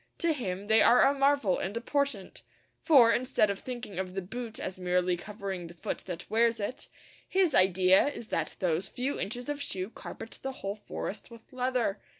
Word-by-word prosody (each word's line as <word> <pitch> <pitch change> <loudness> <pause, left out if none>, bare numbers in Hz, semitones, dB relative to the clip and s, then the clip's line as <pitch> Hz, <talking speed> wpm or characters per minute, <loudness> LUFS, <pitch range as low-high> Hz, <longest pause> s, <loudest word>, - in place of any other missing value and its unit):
To 335 -1 +1
him 195 -8 -4
they 220 +1 +5
are 245 - +6
a 275 - +3
marvel 275 -8 +2
and 200 +4 -3
a - - 0
portent, 275 -5 -2 0.4
for, 260 -8 +6
instead 235 -4 +2
of 200 - -5
thinking 240 -7 -6
of 185 -1 -4
the 195 - -1
boot 230 +3 -6
as 185 0 -5
merely 180 0 +1
covering 195 -1 -6
the 170 - -13
foot - - -4
that 175 -1 -6
wears 230 +1 +2
it, 205 +5 -4 0.4
his 375 -5 +2
idea 185 +3 +5
is 235 -6 -6
that - - -2
those 180 0 0
few 255 +6 -3
inches 245 +4 -4
of 290 -1 -3
shoe 190 -6 -4
carpet 225 - -9
the 270 - -4
whole 200 -5 -5
forest 205 - -5
with 230 +1 -15
leather. 250 -5 0
220 Hz, 190 wpm, -29 LUFS, 190-255 Hz, 0.4 s, are